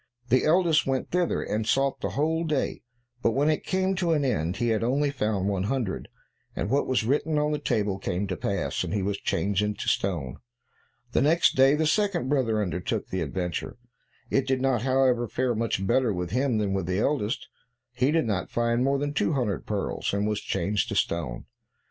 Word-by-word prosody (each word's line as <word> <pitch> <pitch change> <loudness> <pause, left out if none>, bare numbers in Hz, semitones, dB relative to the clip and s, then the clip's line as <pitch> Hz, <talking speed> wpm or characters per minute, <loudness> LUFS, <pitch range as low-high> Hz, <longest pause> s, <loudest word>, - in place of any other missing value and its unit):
The 130 +2 +3
eldest 160 -3 +3
went 135 -1 -1
thither, 180 -1 +1
and 110 +1 -2
sought 135 +2 +1
the - - -3
whole 160 +3 +1
day, 155 -4 -1 0.4
but 115 - +2
when 145 +5 +3
it 155 - -1
came 190 0 0
to 175 -3 +1
an 145 -3 +1
end, 90 -8 0
he 120 - 0
had 110 0 +1
only 140 +4 +1
found 105 -7 -1
one 100 -2 0
hundred, 120 -4 -2 0.5
and 105 - -2
what 140 +1 +2
was 130 -3 +1
written 150 +6 +1
on 150 0 +1
the 150 - -1
table 105 -5 0
came 95 +1 -2
to 95 -2 -3
pass, - - -2
and - - -3
he 100 - 0
was 100 +1 -2
changed 100 0 0
into 105 0 -2
stone. 80 -10 -1 0.8
Next 165 +9 +3
day, 135 +2 +5
the 160 +1 +1
second 175 -4 +1
brother 115 -7 +1
undertook 90 -1 -3
the 95 - -2
adventure; 90 +7 -3 0.5
it 135 -1 +1
did 130 -1 +1
not, 130 -3 +1
however, 130 -2 +2
fare 125 +3 0
much 110 -4 -1
better 125 +3 +2
with 90 -2 -3
him 125 0 +1
than 105 -2 0
with 95 -3 -2
the 90 0 0
eldest; 115 -1 0 0.5
he 125 +2 +1
did 160 -2 +2
not 100 -5 -2
find 120 +1 +1
more 140 +1 +2
than 145 +1 -2
two 160 - +1
hundred 120 -8 -1
pearls, 100 -1 -2
and 100 +1 0
was 105 -1 -1
changed 105 0 -1
to - - -3
stone. 70 -8 -1
120 Hz, 200 wpm, -26 LUFS, 100-140 Hz, 0.8 s, day